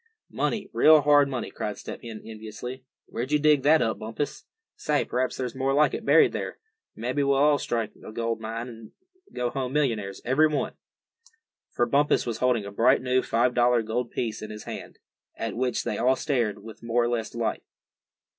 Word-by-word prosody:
"Money, 205 -3 -1
real 155 -1 +7
hard 145 -1 +5
money!" 125 -4 -4
cried 105 -1 -4
Step - - -8
Hen, 115 -2 -8
enviously. 110 +4 -8 0.2
"Where'd 125 +4 -5
you 150 - +5
dig 150 -1 +4
that 155 +2 +5
up, 110 -3 -1
Bumpus? 115 +6 -4 0.3
Say, 150 -1 0
p'raps 130 +1 -1
there's 125 -2 -3
more 135 +1 0
like 150 -1 +4
it - - -4
buried 150 +3 +5
there. - - -4 0.4
Mebbe 125 +5 -4
we'll 140 +1 +3
strike 115 -4 -2
a - - -8
gold 115 0 -2
mine, 115 +2 -4
and 115 -2 -11 0.4
go 120 -1 -2
home 130 -1 -3
millionaires, 110 -10 -1
every 135 +6 +4
one." 150 -2 -2 1.0
For 120 - +1
Bumpus 140 +5 +2
was 115 -2 -3
holding 125 -5 +1
a 100 - -7
bright 125 +6 +3
new 130 0 +2
five 120 +1 +1
dollar 120 -1 +3
gold 115 +2 -2
piece 110 -3 -3
in 110 - -7
his 105 0 -8
hand, - - -8 0.4
at 115 - -4
which 125 0 -1
they 105 - -3
all 130 +3 +3
stared 120 -9 -1
with 110 0 -11
more 115 +1 +1
or 120 - 0
less 115 -2 -2
delight. 115 -1 -2
125 Hz, 190 wpm, -26 LUFS, 115-140 Hz, 1.0 s, real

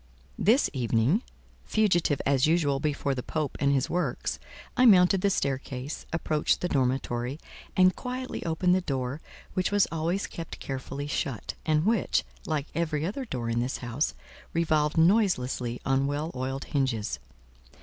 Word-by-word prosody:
This 235 +8 +4
evening, 125 - +2 0.4
fugitive 175 -9 +2
as 135 0 +3
usual 155 -4 +2
before 145 -1 0
the 130 - -3
Pope 155 +2 -3
and 140 -1 +3
his 135 -2 +2
works, 180 +1 -2 0.4
I 255 - +6
mounted 185 -2 +6
the 200 - +3
staircase, 135 -3 -3
approached 155 -2 +1
the 180 - +1
dormitory, 130 -1 -1 0.4
and 185 -1 +6
quietly 255 0 -5
opened 170 +2 +2
the 185 - +3
door, 135 -2 -3 0.3
which 185 -1 +1
was 205 -1 +4
always 165 +4 -1
kept 165 -1 -7
carefully 135 +1 -5
shut, 140 -5 -3
and 155 +1 +3
which, 220 -2 +2 0.2
like 150 -3 -1
every 155 -2 -1
other 235 +9 -3
door 125 - -4
in 115 0 0
this 125 +2 -1
house, 125 +4 -2 0.4
revolved 155 -2 +1
noiselessly 160 - +2
on 135 +1 +2
well 145 +3 -2
oiled 135 +1 -3
hinges. 120 - -1
150 Hz, 150 wpm, -28 LUFS, 135-180 Hz, 0.4 s, I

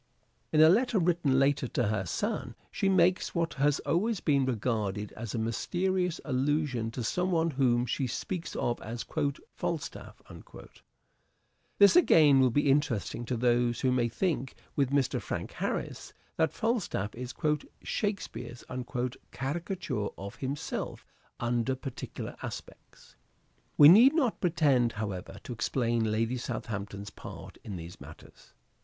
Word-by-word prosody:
In 155 - +5
a 155 - +9
letter 230 +5 +3
written 170 -6 +2
later 135 -1 +2
to 120 -3 0
her 100 -4 -1
son - - -2 0.2
she 195 - 0
makes 185 +1 +3
what 165 -1 0
has 145 +1 +2
always 210 +5 0
been 140 -5 +2
regarded 105 -4 -1
as 115 -1 -6
a - - -1
mysterious 180 - -1
allusion 135 -3 0
to 120 +2 -5
some 180 +10 0
one 165 -2 +2
whom 125 -3 +2
she 130 +1 -1
speaks 170 +8 -4
of 120 - -1
as 115 +2 -5 0.2
" 140 - -13
Falstaff." 165 -4 -4 1.6
This, 200 +5 +7
again, 155 - +6
will 130 -1 +5
be 145 +5 +1
interesting 125 -4 0
to 125 0 -2
those 120 0 +2
who 130 - +2
may 120 -2 +2
think 145 -2 -1 0.2
with 140 -3 +2
Mr. 140 -2 +1
Frank - - -4
Harris - - -4 0.2
that 160 -1 +2
Falstaff 210 - -1
is 125 +1 -7 0.4
" - - -32
Shakespeare's 155 - -3 0.4
" 125 - -9
caricature 145 - -3
of 100 +3 -8
himself 140 +2 -4 0.3
under 120 +2 0
particular 130 0 -7
aspects. - - -10 0.6
We 145 - +10
need 235 - +8
not 260 -9 +1
pretend, 145 -9 +3
however, 100 -4 -5
to 125 - -6
explain 120 -2 0
Lady 115 +3 0
Southampton's 100 -4 -5
part - - -10
in 100 - -6
these 85 0 -9
matters. - - -14
130 Hz, 140 wpm, -30 LUFS, 115-165 Hz, 1.6 s, We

